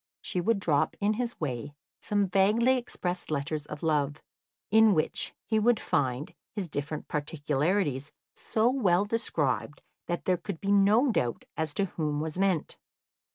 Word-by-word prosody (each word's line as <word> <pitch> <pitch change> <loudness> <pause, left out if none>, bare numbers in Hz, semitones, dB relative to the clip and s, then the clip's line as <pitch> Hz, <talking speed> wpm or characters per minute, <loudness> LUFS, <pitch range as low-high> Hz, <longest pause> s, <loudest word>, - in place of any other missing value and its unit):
She 180 - -1
would 220 +2 +2
drop 150 -6 +1
in 210 +1 +2
his 235 +1 -3
way 140 -1 -4 0.2
some 205 -1 +1
vaguely 210 +7 +3
expressed 180 -7 -3
letters 150 0 -2
of 150 - -8
love, 150 -3 +1 0.6
in 220 -2 +6
which 155 - -1
he 220 -1 +1
should 235 0 +4
find 130 +2 -1 0.2
his 200 -4 -3
different 145 0 -4
peculiarities 150 0 -1 0.2
so 220 +1 +1
well 200 -8 +2
described 155 - -1 0.2
that 175 - -3
there 185 -1 +2
could 175 -1 -6
be 200 - -1
no 210 +6 +5
doubt 120 - -1
as 160 -2 -2
to 200 - +1
whom 150 -5 -2
was 155 +3 -3
meant. 190 -5 0
175 Hz, 155 wpm, -29 LUFS, 150-205 Hz, 0.6 s, in